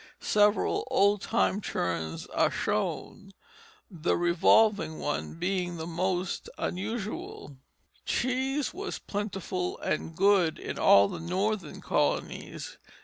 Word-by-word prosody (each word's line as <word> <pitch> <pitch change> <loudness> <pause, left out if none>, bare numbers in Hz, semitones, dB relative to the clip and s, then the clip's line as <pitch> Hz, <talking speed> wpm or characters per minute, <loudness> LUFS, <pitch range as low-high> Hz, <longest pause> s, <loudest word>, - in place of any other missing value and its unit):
Several 210 +3 +2
old 205 -5 +3
time 200 +1 +1
churns 80 - -3
are - - +1
shown, 195 -1 -3 0.6
the 170 -2 0
revolving 175 +1 +3
one 145 - -3
being 180 0 -2
the 160 - -5
most 180 +2 -2
unusual. 220 - -4 0.5
Cheese 265 +3 0
was 395 +3 -4
plentiful 195 -3 -3
and 160 +1 -3
good 190 -3 +3
in - - -6
all 100 0 +7
the - - -6
Northern 185 0 -2
colonies. - - -2
190 Hz, 105 wpm, -29 LUFS, 170-210 Hz, 0.6 s, all